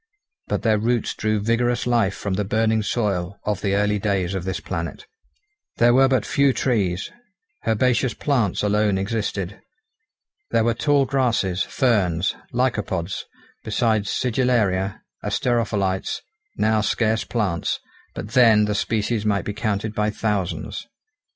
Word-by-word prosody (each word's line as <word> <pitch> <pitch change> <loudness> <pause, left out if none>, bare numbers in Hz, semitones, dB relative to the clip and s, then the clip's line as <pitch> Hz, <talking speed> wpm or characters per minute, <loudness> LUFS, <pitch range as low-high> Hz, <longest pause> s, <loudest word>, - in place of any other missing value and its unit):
But - - -2
their 110 -3 +3
roots 115 +1 0
drew 110 0 0
vigorous 120 +3 +1
life 115 -6 +2
from 100 -1 -3
the 105 +2 0
burning 110 +2 +1
soil 100 -4 -1
of 105 -2 -2
the 100 -1 +1
early 105 0 +1
days 95 -3 0
of 95 -2 -3
this 95 -3 -2
planet. 85 +1 -5 0.7
There 120 0 +5
were 135 +1 +6
but 130 -4 +1
few 140 -1 +3
trees. 100 -8 0 0.6
Herbaceous 120 +2 +2
plants 120 -12 0
alone 105 -1 +2
existed. 100 -1 -3 0.9
There 115 - +2
were 115 +1 +2
tall 140 +3 +2
grasses, 115 -9 +1
ferns, 95 - +1 0.2
lycopods, 105 -8 -1 0.4
besides 110 -4 +1
sigillaria, 110 -7 0 0.2
asterophyllites, 105 -6 0 0.4
now 110 0 +2
scarce 110 +1 +1
plants, 95 -8 -1 0.4
but 105 - -6
then 115 -3 +5
the 105 - -1
species 105 +1 0
might 100 -3 0
be 105 - -3
counted 110 -1 -2
by 105 0 0
thousands. 105 -4 -2
105 Hz, 130 wpm, -23 LUFS, 100-120 Hz, 0.9 s, were